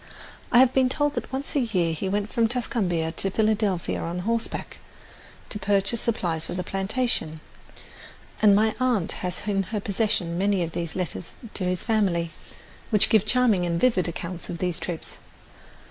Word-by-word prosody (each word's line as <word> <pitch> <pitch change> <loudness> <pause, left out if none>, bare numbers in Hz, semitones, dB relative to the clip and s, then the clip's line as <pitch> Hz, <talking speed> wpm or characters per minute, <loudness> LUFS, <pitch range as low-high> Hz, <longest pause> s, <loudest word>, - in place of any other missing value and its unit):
I 240 - +5
have 255 0 +6
been 260 -1 +4
told 290 +2 +1
that - - -4
once 270 +3 -4
a - - +4
year 185 -9 +1
he 190 +4 -3
went 205 +2 -1
from 230 -1 +3
Tuscumbia 195 -9 -1
to 195 - +1
Philadelphia 210 -3 +1
on 170 +1 -3
horseback 230 +4 -2 0.7
to 210 - -4
purchase 200 +3 +1
supplies 170 -8 -1
for 175 - -5
the 180 - -2
plantation, 195 -4 -1 1.0
and 205 -2 +7
my 215 +1 +3
aunt 245 -9 +1
has 180 +3 -4
in 200 -1 +2
her 205 +3 -3
possession 195 -4 -1
many 195 -2 +2
of 165 - -4
the 170 0 -3
letters 170 - -3 0.2
to 185 - -2
his 180 -1 -1
family, 185 -7 +1 0.6
which 210 -4 +4
give 215 -1 +4
charming 240 -7 +3
and 170 -1 0
vivid 225 -7 +3
accounts 170 +1 -6
of 170 - -4
these 180 -2 -1
trips. 170 -3 -6
195 Hz, 170 wpm, -25 LUFS, 175-225 Hz, 1.0 s, and